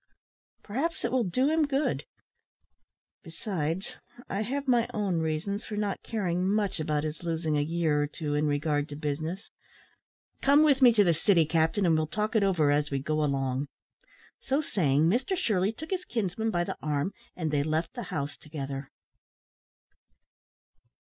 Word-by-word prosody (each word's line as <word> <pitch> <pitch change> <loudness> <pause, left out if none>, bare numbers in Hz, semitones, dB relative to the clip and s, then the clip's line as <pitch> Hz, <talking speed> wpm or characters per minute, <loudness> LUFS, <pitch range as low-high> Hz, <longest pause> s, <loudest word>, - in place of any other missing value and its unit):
Perhaps 275 +11 -2
it 235 - -1
will 255 -1 +2
do 250 +8 +1
him 315 -2 +3
good. 280 +1 0 1.2
Besides, 165 0 -4 0.3
I 195 - -2
have 275 +5 -3
my 240 -2 +3
own 195 -5 0
reasons 160 +6 -2
for 210 - -6
not 205 -2 -1
caring 185 -4 -1
much 205 -4 0
about 150 -1 0
his 155 0 -4
losing 165 -2 -1
a 145 - +2
year 155 -1 +1
or 145 - 0
two 150 0 -4
in 150 +1 +1
regard 145 0 0
to 145 - -6
business. 155 +5 -4 0.9
Come 285 +2 +6
with 280 -3 +4
me 250 -2 +9
to 210 -2 +5
the 175 -3 +4
city, 165 +1 +3
captain, 165 +5 +1
and 165 -2 +4
we'll 155 0 +1
talk 215 +6 -2
over 185 -8 +3
it 145 - +4
as 150 0 -1
we 140 - -1
go 155 +3 0
along." 135 -1 0 0.7
So 275 +2 0
saying, 155 - +1
Mr 250 - +2
Shirley 205 - +1
took 310 - -9
his 370 -1 -1
kinsman 220 - -2
by 175 -5 +1
the - - -5
arm, 150 +4 -1 0.2
and 160 -4 -2
they 145 -1 +2
left 155 +3 -1
the - - -5
house 140 -2 -3
together. 140 -3 -6
170 Hz, 170 wpm, -28 LUFS, 150-215 Hz, 1.2 s, me